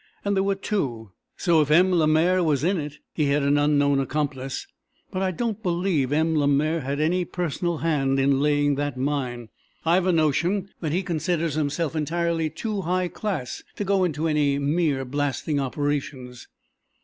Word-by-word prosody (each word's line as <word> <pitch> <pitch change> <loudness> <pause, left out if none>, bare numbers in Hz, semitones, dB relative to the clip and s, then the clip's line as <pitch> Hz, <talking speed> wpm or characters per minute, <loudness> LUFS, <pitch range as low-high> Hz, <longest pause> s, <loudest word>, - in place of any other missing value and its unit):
And 200 0 +1
there 190 - +2
were 195 0 +1
two, 130 - -3 0.3
so, 170 -4 +3
if 150 - 0
M. 180 +5 +5
Lemaire 170 +3 +3
was 150 -4 +1
in 185 +2 +1
it, 150 -1 -6 0.2
he 155 - 0
had 140 +1 +2
an 140 +1 +3
unknown 145 -1 +3
accomplice. 135 -1 -3 0.5
But 185 - -2
I 190 - +1
don't 220 +3 -3
believe 175 - 0
M. 160 +2 +2
Lemaire 150 +2 +2
had 140 +2 -3
any 175 +4 +1
personal 175 -1 -2
hand 140 -4 +1
in 135 0 +3
laying 145 -1 +2
that 145 -2 -2
mine. 125 -4 -2 0.4
I've 175 +3 +3
a - - +4
notion 170 +5 +1
that 155 -4 -2
he 180 +5 0
considers 170 -2 -1
himself 155 +2 -1
entirely 165 +1 0
too 205 +6 -3
high 180 +1 0
class 185 - -4
to - - -3
go 195 -1 +2
into 160 -2 0
any 145 -3 +2
mere 145 -1 0
blasting 145 +2 -1
operations." 135 -2 -3
155 Hz, 170 wpm, -24 LUFS, 140-175 Hz, 0.5 s, M